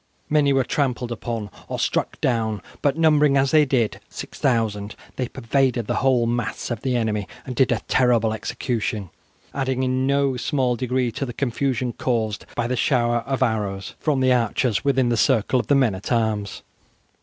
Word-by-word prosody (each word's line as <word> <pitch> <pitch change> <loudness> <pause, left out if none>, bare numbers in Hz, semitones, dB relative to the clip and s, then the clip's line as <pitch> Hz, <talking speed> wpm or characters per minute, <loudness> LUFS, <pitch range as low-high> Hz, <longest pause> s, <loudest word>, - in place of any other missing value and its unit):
Many 150 -2 +4
were 135 -1 +3
trampled 125 -3 -1
upon 115 -3 -4 0.2
or - - -4
struck - - -1
down, 110 -5 0 0.2
but 145 +1 +1
numbering, 150 -3 +4
as 135 0 +2
they 155 -1 +5
did, 125 -5 0
6000, 110 -5 -2 0.2
they 125 - -2
pervaded 125 -1 0
the - - -1
whole 130 -2 +3
mass 120 +1 -2
of 115 -2 -3
the 130 -2 0
enemy, 110 -4 -1 0.2
and 125 - -5
did 130 +1 +3 0.2
terrible 120 -3 +3
execution, 110 -3 -3 0.4
adding 130 -1 -1
in 130 +1 0
no 140 -2 +2
small 130 -1 0
degree 125 0 -1
to 125 - -4
the 120 -3 -4
confusion 125 -1 -1
caused 110 -4 -2
by 120 - 0
the 125 +2 -1
shower 120 -2 +2
of 135 -1 +1
arrows 105 -5 -2
from 145 -4 +1
the 130 -1 +4
archers 115 -1 +1
within 130 -3 +2
the 120 - +1
circle 125 +1 +2
of - - -3
the 145 - +4
men 130 -6 +3
at 95 +5 -6
arms. 110 -4 -1
125 Hz, 175 wpm, -23 LUFS, 115-135 Hz, 0.4 s, they